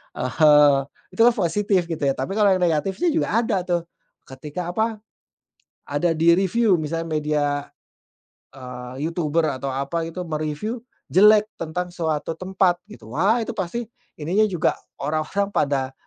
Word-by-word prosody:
Ah 125 Hz, -, -3 dB
hah, 150 Hz, +1 st, +6 dB, 0.4 s
itu -, -, -16 dB
kan 240 Hz, -, +4 dB
positif, 195 Hz, 0 st, +1 dB
gitu, 160 Hz, -, -3 dB
ya, 135 Hz, -, +1 dB
tapi 130 Hz, +7 st, -4 dB
kalau 200 Hz, -2 st, +5 dB
yang 185 Hz, -, 0 dB
negatif, 170 Hz, +3 st, +1 dB
sih, 345 Hz, -1 st, +1 dB
juga 320 Hz, -8 st, 0 dB
ada, 195 Hz, -4 st, 0 dB
tuh, 175 Hz, -2 st, 0 dB, 0.4 s
ketika 150 Hz, +6 st, -6 dB
apa, 220 Hz, +1 st, -2 dB, 0.8 s
ada 145 Hz, +4 st, 0 dB
di-review, 185 Hz, +6 st, +3 dB
misalnya 165 Hz, +2 st, -3 dB
media, 150 Hz, -2 st, 0 dB, 1.1 s
eee, 125 Hz, +2 st, -7 dB
YouTuber 165 Hz, -1 st, 0 dB, 0.2 s
atau 140 Hz, -, -2 dB
apa 140 Hz, +5 st, -2 dB
gitu, 180 Hz, +2 st, -6 dB
me-review 155 Hz, +9 st, -3 dB, 0.3 s
jelek 210 Hz, +2 st, +6 dB, 0.2 s
tentang 175 Hz, +2 st, -4 dB
suatu 160 Hz, -2 st, -2 dB
tempat, 185 Hz, 0 st, 0 dB
gitu, 215 Hz, -, -12 dB
wah, 220 Hz, +5 st, +3 dB
itu 235 Hz, 0 st, -3 dB
pasti 220 Hz, +4 st, -3 dB, 0.3 s
ininya 180 Hz, +8 st, +2 dB
juga 175 Hz, -4 st, +1 dB, 0.2 s
orang-orang 155 Hz, +8 st, -1 dB
pada 135 Hz, -2 st, 0 dB
170 Hz, 145 wpm, -23 LUFS, 150-195 Hz, 1.1 s, hah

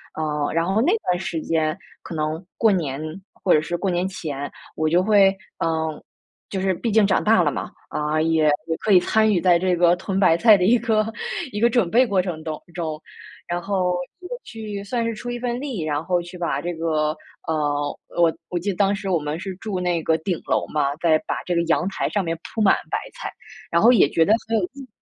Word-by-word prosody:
呃， 150 Hz, -2 st, -1 dB
然 165 Hz, +1 st, +2 dB
后 195 Hz, +4 st, +1 dB
那 350 Hz, -, +3 dB, 0.2 s
段 180 Hz, 0 st, +2 dB
时 175 Hz, -4 st, -3 dB
间 155 Hz, -1 st, 0 dB, 0.2 s
可 170 Hz, -, -8 dB
能 155 Hz, +3 st, -2 dB
过 225 Hz, -2 st, +4 dB
年 150 Hz, -7 st, -1 dB, 0.3 s
或 185 Hz, -, +1 dB
者 150 Hz, -, +4 dB
是 170 Hz, +3 st, -3 dB
过 195 Hz, +3 st, -1 dB
年 175 Hz, +1 st, 0 dB
前， 145 Hz, -7 st, -5 dB, 0.3 s
我 155 Hz, -, +1 dB
就 175 Hz, +3 st, +3 dB
会 200 Hz, -1 st, +5 dB, 0.2 s
呃， 160 Hz, -1 st, -1 dB, 0.5 s
就 190 Hz, -2 st, -3 dB
是 190 Hz, -1 st, +2 dB
毕 230 Hz, +7 st, -3 dB
竟 220 Hz, -1 st, +4 dB
长 190 Hz, -, +2 dB
大 215 Hz, -5 st, +4 dB
了 150 Hz, -, +2 dB
嘛， -, -, -4 dB, 0.2 s
啊， 150 Hz, +1 st, 0 dB
也 160 Hz, -1 st, +2 dB, 0.2 s
也 160 Hz, -, -1 dB
可 210 Hz, -, +2 dB
以 180 Hz, -, +8 dB
参 220 Hz, +2 st, +3 dB
与 175 Hz, -, +1 dB
在 175 Hz, -2 st, +4 dB
这 185 Hz, 0 st, +1 dB
个 175 Hz, 0 st, +4 dB
囤 190 Hz, +1 st, -3 dB
白 170 Hz, -3 st, +5 dB
菜 220 Hz, +2 st, +7 dB
的 180 Hz, -, +1 dB
一 225 Hz, +7 st, +5 dB
个 215 Hz, -2 st, +1 dB, 0.5 s
一 205 Hz, -, -3 dB
个 235 Hz, +2 st, +4 dB
准 230 Hz, -7 st, +2 dB
备 255 Hz, +3 st, +5 dB
过 195 Hz, -4 st, +2 dB
程 170 Hz, -4 st, -5 dB
当 155 Hz, -2 st, -3 dB, 0.2 s
中， 160 Hz, -3 st, -4 dB, 0.5 s
然 175 Hz, 0 st, -1 dB
后 180 Hz, -1 st, 0 dB, 0.2 s
也 360 Hz, -, -10 dB
去 215 Hz, -3 st, -6 dB
算 235 Hz, +3 st, -2 dB
是 230 Hz, -1 st, -2 dB
出 240 Hz, +3 st, -6 dB
一 240 Hz, -, -4 dB
份 240 Hz, 0 st, -2 dB
力， 260 Hz, -, -4 dB
然 150 Hz, -1 st, -1 dB
后 180 Hz, -1 st, +1 dB
去 175 Hz, +1 st, -10 dB
把 170 Hz, -, -1 dB
这 175 Hz, 0 st, -3 dB
个， 155 Hz, -2 st, 0 dB, 0.3 s
呃， 145 Hz, -2 st, -1 dB, 0.2 s
我 170 Hz, -1 st, +4 dB, 0.2 s
我 175 Hz, -, -1 dB
记 190 Hz, +4 st, -3 dB
得 195 Hz, -, -1 dB
当 200 Hz, 0 st, +3 dB
时 200 Hz, -1 st, -5 dB
我 180 Hz, -, +3 dB
们 150 Hz, +1 st, -3 dB
是 190 Hz, 0 st, -5 dB
住 195 Hz, -1 st, -4 dB
那 175 Hz, -2 st, 0 dB
个 160 Hz, -, +2 dB
顶 175 Hz, 0 st, -2 dB
楼 -, -, 0 dB
嘛， 145 Hz, -2 st, 0 dB
再 160 Hz, -2 st, +4 dB
把 -, -, -2 dB
这 175 Hz, -, -2 dB
个 170 Hz, -, +2 dB
阳 170 Hz, +2 st, +1 dB
台 -, -, -2 dB
上 205 Hz, -2 st, 0 dB
面 165 Hz, -1 st, -2 dB, 0.2 s
铺 220 Hz, -, -1 dB
满 200 Hz, -, +5 dB, 0.2 s
白 -, -, +1 dB, 0.2 s
菜， -, -, -6 dB, 0.4 s
然 170 Hz, -, +3 dB
后 235 Hz, -, +7 dB
也 235 Hz, -11 st, +5 dB
觉 165 Hz, -, +4 dB
得 200 Hz, -, +2 dB, 0.2 s
很 225 Hz, 0 st, +1 dB
有 -, -, -2 dB
意。 275 Hz, -2 st, -10 dB
180 Hz, 250 characters per minute, -23 LUFS, 160-205 Hz, 0.5 s, 以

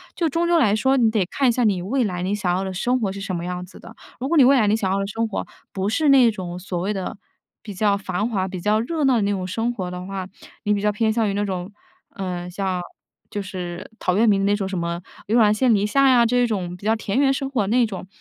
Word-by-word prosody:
就 335 Hz, -2 st, 0 dB
终 335 Hz, +4 st, 0 dB
究 340 Hz, -1 st, +4 dB
来 210 Hz, -7 st, +3 dB
说， 265 Hz, +5 st, +2 dB
你 230 Hz, -3 st, +4 dB
得 210 Hz, -5 st, +1 dB
看 260 Hz, +7 st, +1 dB
一 -, -, +5 dB
下 245 Hz, +1 st, 0 dB
你 200 Hz, -5 st, +2 dB
未 245 Hz, +8 st, 0 dB
来 180 Hz, -5 st, -2 dB
你 200 Hz, +2 st, 0 dB
想 180 Hz, -4 st, 0 dB
要 190 Hz, -, -1 dB
的 190 Hz, -, -4 dB
生 245 Hz, +7 st, 0 dB
活 195 Hz, -3 st, 0 dB
是 200 Hz, -, -7 dB
什 185 Hz, -2 st, -3 dB
么 170 Hz, +1 st, -4 dB
样 180 Hz, 0 st, -4 dB
子 180 Hz, -, -15 dB
的。 -, -, -13 dB, 0.2 s
如 260 Hz, -, -2 dB
果 335 Hz, -, +2 dB
你 275 Hz, -, +8 dB
未 275 Hz, -, +6 dB
来 220 Hz, -4 st, +3 dB
你 210 Hz, -, +3 dB
想 195 Hz, -4 st, -1 dB
要 195 Hz, -, 0 dB
的 195 Hz, -, -2 dB
生 225 Hz, +3 st, -2 dB
活 215 Hz, -, -4 dB, 0.3 s
不 195 Hz, +1 st, -1 dB
是 295 Hz, +6 st, +2 dB
那 260 Hz, -4 st, +7 dB
种 180 Hz, -4 st, -6 dB
所 180 Hz, -1 st, -4 dB
谓 195 Hz, +4 st, -1 dB
的 190 Hz, -1 st, -5 dB, 0.5 s
比 210 Hz, -2 st, -7 dB
较 200 Hz, +1 st, +2 dB
繁 195 Hz, +3 st, -2 dB
华、 190 Hz, -4 st, -1 dB
比 185 Hz, -2 st, -6 dB
较 210 Hz, +2 st, +2 dB
热 305 Hz, +7 st, -2 dB
闹 265 Hz, -2 st, +4 dB
的 225 Hz, -, +2 dB
那 200 Hz, -, +1 dB
种 185 Hz, -2 st, -2 dB
生 225 Hz, +5 st, -1 dB
活 185 Hz, -5 st, -4 dB
的 180 Hz, 0 st, -6 dB
话， 190 Hz, -1 st, -5 dB, 0.4 s
你 210 Hz, -, +3 dB
比 200 Hz, -, -2 dB
较 210 Hz, -, +3 dB
偏 220 Hz, +1 st, +1 dB
向 225 Hz, -1 st, +1 dB
于 195 Hz, -, -1 dB
那 205 Hz, -, 0 dB
种， 185 Hz, 0 st, -4 dB, 0.4 s
呃， 180 Hz, -2 st, -4 dB
像 190 Hz, 0 st, -2 dB, 0.5 s
就 205 Hz, -, -3 dB
是 180 Hz, -2 st, -6 dB
陶 180 Hz, -, 0 dB
渊 225 Hz, +1 st, +4 dB
明 195 Hz, -1 st, +2 dB
那 205 Hz, -, +3 dB
种 200 Hz, -2 st, -2 dB
什 195 Hz, -, -3 dB
么 170 Hz, 0 st, -3 dB, 0.3 s
悠 225 Hz, +4 st, +2 dB
然 210 Hz, -2 st, +5 dB
见 235 Hz, +2 st, +3 dB
篱 205 Hz, 0 st, +2 dB
下 275 Hz, +5 st, +3 dB
呀 240 Hz, -2 st, +5 dB
这 245 Hz, +1 st, +2 dB
种 180 Hz, -5 st, -3 dB
比 200 Hz, -, -13 dB
较 220 Hz, +1 st, +3 dB
田 215 Hz, -1 st, -3 dB
园 270 Hz, -1 st, +4 dB
生 270 Hz, 0 st, -3 dB
活 225 Hz, -8 st, 0 dB
那 240 Hz, +3 st, +3 dB
种， 190 Hz, -3 st, -7 dB
205 Hz, 305 characters per minute, -22 LUFS, 185-235 Hz, 0.5 s, 你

